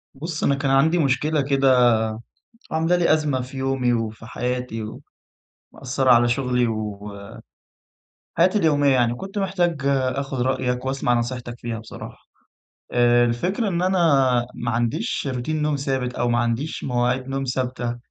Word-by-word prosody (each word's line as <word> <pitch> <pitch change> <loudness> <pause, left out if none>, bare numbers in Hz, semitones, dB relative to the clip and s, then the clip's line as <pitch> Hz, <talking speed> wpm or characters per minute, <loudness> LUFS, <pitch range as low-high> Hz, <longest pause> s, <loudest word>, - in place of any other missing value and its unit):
بُصّ، 155 +3 -5
أنا 140 - +3
كان 140 -1 -1
عندي 155 +6 +4
مشكلة 150 +1 +1
كده 135 -3 +4 0.8
عاملة 165 +2 +2
لي 175 -3 +3
أزمة 150 -4 0
في 130 +2 -8
يومي، 130 -2 0
وفي 110 -1 -3
حياتي، 125 -1 -3 0.9
ومأثرة 135 0 0
على 120 0 +6
شغلي 125 0 +1
و 105 -2 -4
آآ، 100 0 -11 1.0
حياتي 185 +5 +4
اليومية 145 -5 +3
يعني، 120 -2 +2
كنت 195 +10 -8
محتاج 180 -6 0
آخد 135 -1 -1
رأيَك 125 0 -1
وأسمَع 130 -2 0
نصيحتك 120 0 -3
فيها 115 -1 -4
بصراحة. 110 - -10 0.8
آآ، 120 0 +4
الفكرة 180 - -1
إن 175 -1 -1
أنا 185 +1 +1 0.6
ما 120 - -3
عنديش 120 +4 -1
روتين 150 +5 -2
نوم 150 -1 +1
ثابت 135 -3 -2
أو 120 - 0
ما 120 0 +2
عنديش 120 +6 -2
مواعيد 125 0 0
نوم 135 0 -2
ثابتة 125 -2 -2
130 Hz, 145 wpm, -22 LUFS, 120-145 Hz, 1.0 s, على